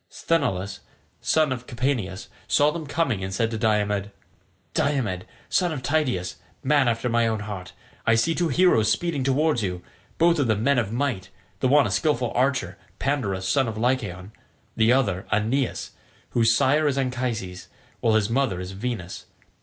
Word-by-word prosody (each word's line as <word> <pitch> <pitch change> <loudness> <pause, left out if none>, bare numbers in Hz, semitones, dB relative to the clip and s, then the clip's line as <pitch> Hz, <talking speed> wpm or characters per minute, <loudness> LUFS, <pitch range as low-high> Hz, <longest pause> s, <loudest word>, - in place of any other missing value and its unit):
Sthenelus, 110 - -1 0.4
son 155 -3 +2
of 125 -1 -4
Capaneus, 120 -7 -2 0.2
saw 145 +1 +4
them 160 -1 -6
coming 135 - 0
and 95 - -4
said 115 +3 0
to 110 - -2
Diomed, 105 -2 +1 0.6
"Diomed, 110 -10 0 0.2
son 180 -2 +1
of 140 -5 -5
Tydeus, 130 - 0 0.3
man 140 -1 +3
after 115 +1 0
my 120 -1 +2
own 110 -2 -1
heart, 100 -4 -7 0.3
I 115 - +4
see 165 +9 +2
two 175 +1 0
heroes 155 - +4
speeding 165 -6 -1
towards 140 0 +2
you, 90 -3 -3 0.3
both 170 0 +4
of 140 - +2
them 110 -1 +1
men 140 0 +3
of 110 -4 -2
might 120 -6 -2 0.3
the - - +2
one 145 +2 +5
a - - -2
skilful 120 - +1
archer, 130 +1 0 0.2
Pandarus 100 -10 -1
son 135 +3 +2
of 110 -2 -4
Lycaon, 110 -6 -1 0.4
the 110 +1 +4
other, 100 -8 +1
Aeneas, 115 +5 0 0.4
whose 115 -1 +3
sire 145 +7 +3
is 140 -2 0
Anchises, 120 -8 -3 0.3
while 110 -1 +2
his 105 -2 +3
mother 115 -5 0
is 90 +1 -6
Venus. 100 -3 -5
120 Hz, 165 wpm, -24 LUFS, 105-140 Hz, 0.6 s, one